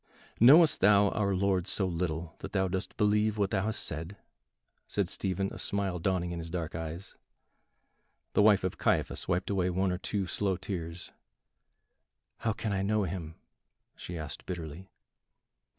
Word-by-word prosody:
"Knowest 150 +7 +7
thou 100 +1 +6
our 100 -2 0
Lord 95 -1 +1
so 95 - +1
little 85 -2 -2
that - - -8
thou 95 -1 +2
dost 95 +1 -4
believe 105 +1 +2
what 100 -2 +1
thou 95 -2 +1
hast 110 -1 0
said?" 80 +5 -4 0.7
said - - 0
Stephen, 95 +1 -1
a - - -8
smile 100 -3 -1
dawning 90 0 0
in 85 - -4
his 85 0 -6
dark 85 -2 -4
eyes. 80 +3 -6 1.2
The - - +4
wife 105 -2 +5
of 95 - -2
Caiaphas - - 0
wiped 90 +2 0
away 95 -2 +1
one 95 +1 +1
or 90 - -2
two 100 -1 -2
slow 95 +1 -1
tears. 85 -3 -5 1.3
"How 110 - 0
can 110 -1 -3
I 95 - 0
know 105 +2 +1
him?" 85 -3 -5 0.6
she 90 - -7
asked 75 -5 -7
bitterly. 85 +1 -6
95 Hz, 160 wpm, -30 LUFS, 85-100 Hz, 1.3 s, Knowest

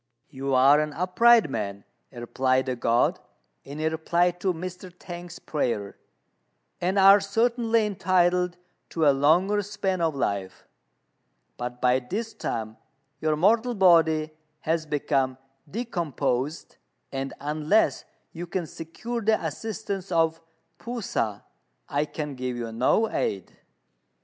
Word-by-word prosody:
"You 135 0 -2
are 135 +3 +6
an 150 -1 -2
upright 210 +5 +4
man," 100 -6 -4 0.3
replied 130 +1 0
the 130 -1 -2
God, 120 0 +1 0.4
in 140 +2 -9
reply 160 +3 +1
to 180 +2 -1
Mr. 180 +2 -7
T'ang's 175 -1 -9
prayer, 115 -9 -2 0.9
"and 185 +3 0
are 195 +1 +8
certainly 230 +2 +1
entitled 180 -3 +1 0.3
to 160 -2 0
a 145 - +6
longer 175 +9 +3
span 200 -3 -2
of 160 -3 +1
life; 100 -7 -3 0.9
but 125 0 -6
by 125 0 +3
this 215 - -5
time 110 -1 -4 0.4
your 155 -1 +1
mortal 225 +9 +2
body 160 -5 +4 0.3
has 160 0 -1
become 135 -3 0 0.3
decomposed, 165 - -3 0.3
and 135 0 -4
unless 155 +8 +1 0.3
you 175 +1 -7
can 175 0 -2
secure 195 +10 -6
the 220 0 +2
assistance 195 +2 -5
of 165 -1 +1 0.4
P'u 235 -1 -5
sa, 105 - -2 0.5
I 145 +1 0
can 150 -1 -5
give 125 -1 -4
you 115 -1 -4
no 130 - +2
aid." 95 -3 -3
160 Hz, 125 wpm, -26 LUFS, 135-190 Hz, 0.9 s, are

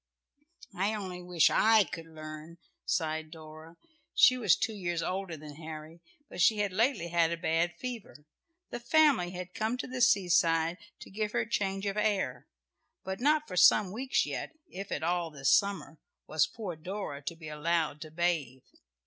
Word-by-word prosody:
"I 195 +4 0
only 185 -3 -6
wish 175 -3 +3
I 220 -1 +5
could 165 0 -8
learn!" 155 +1 -10 0.3
sighed 155 -1 -1
Dora. 160 +1 -12 0.4
She 255 - +7
was 245 -3 +4
two 225 - -2
years 175 -4 -3
older 185 -3 -3
than 150 -1 -11
Harry, 160 +1 -9 0.3
but - - -5
she 215 +5 +5
had 205 -2 -1
lately 220 -4 +1
had 170 -1 +2
a 170 - -2
bad 170 0 0
fever. 225 - -7 0.5
The - - -4
family 265 - +3
had 180 0 -7
come 220 +3 -1
to - - -4
the 255 0 -5
seaside 170 -6 +3 0.2
to - - -11
give 210 +1 -3
her - - +1
change 195 -3 -2
of 200 +1 -2
air, 190 - -1 0.6
but 190 0 -5
not 300 +3 +2
for 185 - -7
some 185 +1 +5
weeks 255 +6 0
yet, - - -5
if 195 +2 -8
at - - -2
all 175 0 0
this 140 -3 0
summer, 200 -6 +1 0.3
was 155 0 +2
poor 205 -7 -6
Dora 175 -3 -6
to 145 +4 -5
be 165 -1 -11
allowed 155 0 -1
to 155 - -7
bathe. 155 -6 -1
175 Hz, 175 wpm, -30 LUFS, 160-210 Hz, 0.6 s, She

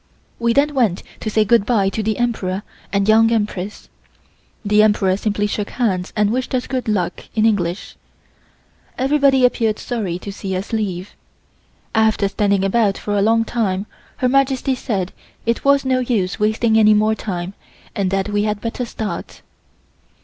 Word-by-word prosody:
We 235 0 +2
then 290 +3 +2
went 230 -10 +1 0.2
to 215 - -3
say 215 0 +2
good 230 0 +4
bye 205 -3 +2
to 220 - -3
the 215 0 -1
Emperor 205 -5 -1 0.3
and 200 0 +1
Young 225 +1 +5
Empress. 210 -3 -2 0.8
The 210 +1 +4
Emperor 205 -3 +3
simply 205 0 -1
shook 205 0 -2
hands 190 -7 -1
and 210 -1 +2
wished 255 +2 -1
us 250 - -1
"Good 255 -3 -3
Luck" 185 -5 -1
in 220 -1 +3
English. 185 -5 -1 1.0
Everybody 270 -1 +3
appeared 225 -3 +1
sorry 205 -8 -3
to 200 +2 -7
see 195 -1 -4
us 190 +5 -5
leave. 195 -3 -3 0.8
After 220 -2 +2
standing 200 -1 +1
about 200 0 +2
for 205 - -3
a 200 - +2
long 225 +2 +3
time 200 -5 -1 0.3
Her 255 - +1
Majesty 270 0 +2
said 200 -7 -3 0.3
it 230 +1 0
was 280 0 +3
no 260 -1 +2
use 220 -7 -1
wasting 220 +1 +2
any 215 -1 +6
more 215 +1 +3
time 185 -4 -4 0.4
and 195 -2 0
that 195 +1 0
we 205 0 +1
had 210 0 -1
better 230 +3 -3
start. 220 -2 -6
215 Hz, 165 wpm, -19 LUFS, 200-235 Hz, 1.0 s, any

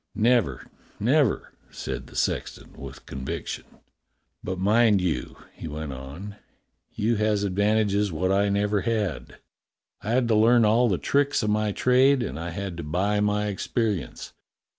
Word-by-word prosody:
"Never, 115 - +2 0.3
never!" 130 +3 +1 0.2
said 65 0 -6
the - - -15
sexton - - -2
with 70 -1 -10
conviction. 65 0 -5 0.8
"But 95 0 -3
mind 105 +2 +4
you," 85 -9 -2 0.2
he - - -8
went 75 -2 -5
on, 75 +11 -9 0.6
"you 110 +2 +1
has 105 -1 +1
advantages 100 +1 +1
wot 95 +4 0
I 100 +1 +2
never 100 0 +1
had. 105 -8 -2 0.6
I 105 - -6
had 125 -1 +2
to 110 - +4
learn 115 +2 +5
all 115 +3 +4
the 95 - +1
tricks 140 +3 +1
o' - - 0
my 105 0 +1
trade, 130 +4 +3
and 75 - -5
I 85 +1 -4
had 95 0 -5
to 85 - -5
buy 95 +7 0
my 105 0 +1
experience. 105 - -3
105 Hz, 150 wpm, -25 LUFS, 90-110 Hz, 0.8 s, learn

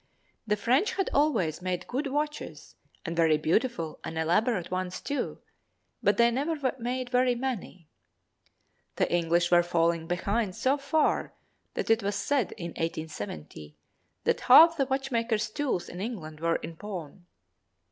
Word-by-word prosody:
The 210 - +2
French 260 - +2
had 390 - -1
always 225 - +1
made 180 -1 -2
good 275 +4 -2
watches 295 +2 -4 0.3
and 170 -1 -3
very 160 -2 +4
beautiful 165 - 0
and 160 - -5
elaborate 180 +4 +1
ones 185 0 -3
too, 285 -1 -3 0.6
but 205 0 +2
they 235 0 +5
never 285 +1 -1
made 250 +1 -3
very 250 -1 +3
many. 235 - -5 1.1
The - - 0
English 175 0 +2
were 175 0 +7
falling 170 -1 +1
behind 195 +3 -1
so 265 +2 +2
far 280 +3 +1 0.4
that - - 0
it 225 +1 +4
was 200 0 -1
said, 245 +2 0
in 170 -1 -6
1870, 100 - -6 0.5
that - - +1
half 330 +6 +8
the 275 -4 0
watchmakers' 235 -5 -1
tools 265 -9 -2
in 180 - -7
England 170 -9 -6
were 165 +1 +1
in 165 - -6
pawn. 180 -3 -8
205 Hz, 145 wpm, -28 LUFS, 170-260 Hz, 1.1 s, half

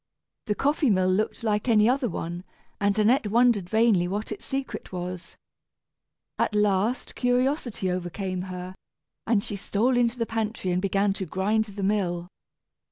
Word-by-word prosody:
The 210 - +1
coffee 285 +1 +2
mill 185 -2 +3
looked 215 +4 -1
like 210 +1 0
any 215 -1 +5
other 255 0 +2
one, 175 0 -5 0.4
and 200 +1 +1
Annette 220 +2 +3
wondered 225 -4 +3
vainly 220 -5 +3
what 205 +4 -3
its 215 - -6
secret 270 -1 -4
was. 180 0 -6 1.0
At 210 - +1
last 210 +3 +1
curiosity 245 - 0
overcame 185 +1 -3
her, 180 0 -6 0.5
and 220 -3 +2
she 205 - -5
stole 210 +6 +1
into 240 0 +2
the 230 - 0
pantry 220 -4 -2
and 180 +1 +1
began 195 +1 +1
to 190 -2 -5
grind 210 +6 +1
the 200 -1 -7
mill. 180 -4 0
210 Hz, 155 wpm, -26 LUFS, 185-230 Hz, 1.0 s, any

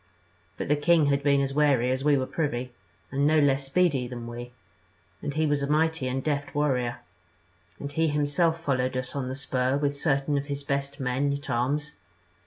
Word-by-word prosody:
But - - -3
the 150 - +3
king 160 +1 +4
had 140 - +1
been 140 -1 +3
as 135 0 -1
wary 135 -4 +3
as 130 +1 -1
we 145 -1 +4
were 130 - 0
privy, 130 -5 -2 0.4
and 140 +1 +2
no 155 +1 +4
less 140 -2 +3
speedy 140 -5 +2
than 120 -1 -7
we; 120 +1 -7 0.7
and 145 - -4
he 155 0 +2
was 145 -1 +1
a 140 - -1
mighty 160 -2 +1
and 130 +1 -2
deft 145 -2 -2
warrior, 125 -5 0 0.8
and 140 - -5
he 160 +3 +1
himself 150 +3 +1
followed 130 -5 0
us 130 +1 -4
on 130 -2 -2
the 130 - -4
spur 130 -1 0
with 145 0 0
certain 140 -1 +1
of 140 - -6
his 140 -1 -4
best 140 0 -2
men 135 +2 0
at 140 0 -5
arms. 145 +5 0
140 Hz, 195 wpm, -27 LUFS, 130-150 Hz, 0.8 s, king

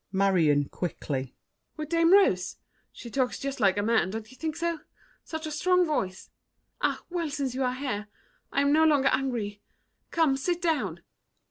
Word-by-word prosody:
MARION 175 -8 +3
(quickly). 135 -6 -4 0.4
With 305 -1 -5
Dame 335 0 +3
Rose! 200 - +4 0.3
She 235 - -10
talks 255 -1 0
just 275 0 -4
like 195 -1 +3
a 205 - +1
man, 225 -4 +2
don't 220 +2 -6
you - - -14
think 315 +2 -3
so? 335 -1 -1 0.4
Such 320 0 -6
a 310 - -4
strong 360 +4 +3
voice! 190 - -3 0.5
Ah, - - 0
well, 340 -3 -1
since 275 -3 -2
you 265 +1 -1
are 250 0 0
here 250 -6 -3 0.4
I 280 - +2
am 280 +1 +3
no 315 +1 +5
longer 290 -4 +4
angry! 235 -6 -1 0.5
Come, 315 -5 +2
sit 345 +6 -1
down. 330 -4 -1
270 Hz, 170 wpm, -28 LUFS, 205-315 Hz, 0.5 s, no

